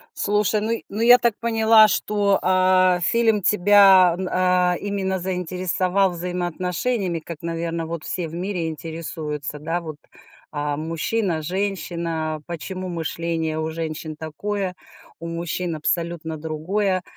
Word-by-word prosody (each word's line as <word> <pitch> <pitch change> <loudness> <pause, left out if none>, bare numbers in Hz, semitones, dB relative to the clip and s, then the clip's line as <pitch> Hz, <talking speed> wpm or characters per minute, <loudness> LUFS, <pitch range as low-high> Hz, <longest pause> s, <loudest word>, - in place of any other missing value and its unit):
Слушай, 210 0 +1
ну, 220 - -1
й 230 - -3
ну, 210 - -4
я 245 +2 +8
так 235 -3 +1
поняла, 225 -1 +5
что, 205 -1 +1
а, 185 -1 +4
фильм 225 +3 +2
тебя, 195 -2 +6
м, 190 - -2
а, 180 -1 +2
именно 195 -2 -2
заинтересовал 185 +1 0
взаимоотношениями, 180 +3 -2
как 160 0 -8
наверно, 165 0 -3
вот 165 -1 -5
все 175 -3 -3
в 160 - -11
мире 180 -1 -2
интересуются, 155 -3 -5
да, 165 +4 -2
вот? 155 -3 -7 0.5
А 145 -1 -2
мужчина, 165 +3 -1
женщина, 170 -3 -3
почему 185 +2 -5
мышление 165 -1 -2
у 160 0 -2
женщин 160 -1 -5
такое, 180 +5 -4 0.5
у 170 - -6
мужчин 170 +1 -3
абсолютно 160 0 -2
другое. 180 +5 -1
180 Hz, 130 wpm, -22 LUFS, 160-195 Hz, 0.5 s, я